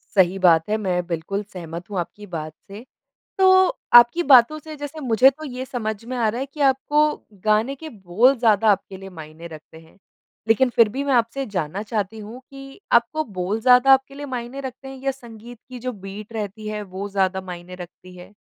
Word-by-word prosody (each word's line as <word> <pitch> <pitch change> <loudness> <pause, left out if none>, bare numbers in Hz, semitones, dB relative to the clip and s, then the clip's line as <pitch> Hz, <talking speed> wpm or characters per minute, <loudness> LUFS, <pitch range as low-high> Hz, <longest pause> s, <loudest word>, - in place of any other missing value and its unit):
सही 190 -1 +3
बात 170 -1 +4
है 215 - +1
मैं 180 -4 -2
बिल्कुल 180 +4 -3
सहमत 175 -3 -9
हूँ 200 -3 -3
आपकी 205 +4 -7
बात 155 -4 -6
से। 205 +4 -11 0.5
तो 380 - +5 0.5
आपकी 240 +8 +7
बातों 275 0 +5
से 310 0 -10
जैसे 290 +2 -7
मुझे 250 0 +4
तो 310 +3 -12
ये 255 -3 -6
समझ 220 -4 -5
में 255 +2 -5
आ 230 -3 +1
रहा 235 +4 -3
है 270 - -3
कि 285 +2 -13
आपको 275 +2 +2 0.4
गाने 215 +5 +2
के 315 +3 -9
बोल 220 - +2
ज़्यादा 220 -2 +3
आपके 195 -1 -1
लिए 195 +1 -10
मायने 155 +2 -11
रखते 160 -1 -12
हैं। 160 0 -21 0.5
लेकिन 235 +4 +4
फ़िर 230 -2 +6
भी 270 +6 -4
मैं 280 -2 +1
आपसे 240 +3 0
जानना 185 -1 -4
चाहती 215 -1 -3
हूँ 220 +4 -9
कि 275 +3 -12
आपको 235 +7 +2 0.2
बोल 200 +5 -2
ज़्यादा 250 +2 +6
आपके 270 +1 +2
लिए 290 +1 -7
मायने 255 0 -6
रखते 265 0 -8
हैं 270 0 -9
या 275 - 0
संगीत 240 -2 -12
की 255 -1 -9
जो 250 +1 -4
बीट 200 +1 -10
रहती 215 0 -5
है 210 0 -4
वो 195 +1 -7
ज़्यादा 190 -1 0
मायने 180 -1 -9
रखती 180 0 -12
है? 180 +2 -13
220 Hz, 205 wpm, -22 LUFS, 190-260 Hz, 0.5 s, आपकी